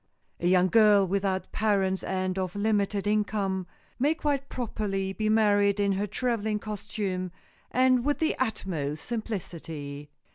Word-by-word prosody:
A 175 - 0
young 185 0 +5
girl 210 -1 +6
without 190 0 -1
parents 195 -3 +1
and 185 -1 -2
of 185 -1 -3
limited 205 -1 +1
income 205 -3 0 0.3
may 290 +5 +3
quite 285 -3 -1
properly 195 -5 -2
be 215 +1 -1
married 205 -2 +3
in 200 -1 +2
her 195 +2 0
traveling 220 -2 -1
costume 205 -3 -4 0.4
and 255 -1 +3
with 290 +2 +1
the 320 - +1
utmost 165 - -2
simplicity. 165 -10 -5
205 Hz, 135 wpm, -28 LUFS, 190-220 Hz, 0.4 s, girl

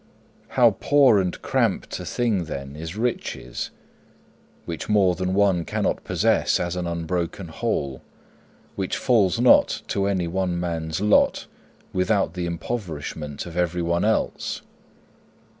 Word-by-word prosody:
How - - +5
poor 135 -7 +5
and 90 -2 -2
cramped - - 0
a - - -6
thing, 110 -8 0
then, 70 -2 -6
is 80 +5 -6
riches, 120 +2 -3 1.0
which - - -5
more 100 -4 +4
than 95 +1 -2
one 95 -4 +3
cannot - - -1
possess - - +2
as 85 0 -2
an 90 -1 -2
unbroken 85 +1 -3
whole, 70 -4 -2 0.7
which 95 -2 -2
falls 115 -6 +2
not 125 0 +5
to 100 0 0
any 95 -4 0
one 90 0 -1
man's 85 -1 -3
lot 105 0 +3 0.5
without 95 -1 +1
the 90 -1 -3
impoverishment 80 -6 -5
of 85 -1 -9
everyone 85 -1 0
else! 110 +1 -1
90 Hz, 125 wpm, -24 LUFS, 85-100 Hz, 1.0 s, How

